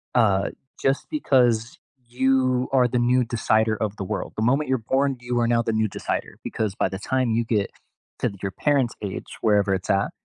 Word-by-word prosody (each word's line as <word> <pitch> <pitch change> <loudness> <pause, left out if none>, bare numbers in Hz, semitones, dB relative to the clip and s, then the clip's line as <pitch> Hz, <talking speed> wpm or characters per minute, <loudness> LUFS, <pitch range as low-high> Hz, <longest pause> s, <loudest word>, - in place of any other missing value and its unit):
uh, 100 -5 +3 0.3
just 135 +1 0
because 125 - +2 0.3
you 130 0 +1
are 125 -2 +5
the 125 0 0
new 125 +1 +3
decider 110 -1 +1
of 105 -2 -2
the - - -4
world. 95 - -4
The 110 - 0
moment 135 +4 +2
you're 130 - +2
born, 135 +3 0
you 120 0 -1
are 120 - +2
now 115 0 +3
the 115 -1 -1
new 110 0 +2
decider, - - -4
because 105 -3 -2
by - - +1
the 95 +1 -6
time 130 +1 0
you 115 +1 +1
get 105 -4 0 0.5
to - - +1
th 100 -2 -13
your 95 - -1
parents' 135 0 +1
age, 100 -2 -5 0.2
wherever 105 -3 +3
it's 95 -2 -3
at, 100 +1 +2
115 Hz, 205 wpm, -24 LUFS, 105-130 Hz, 0.5 s, are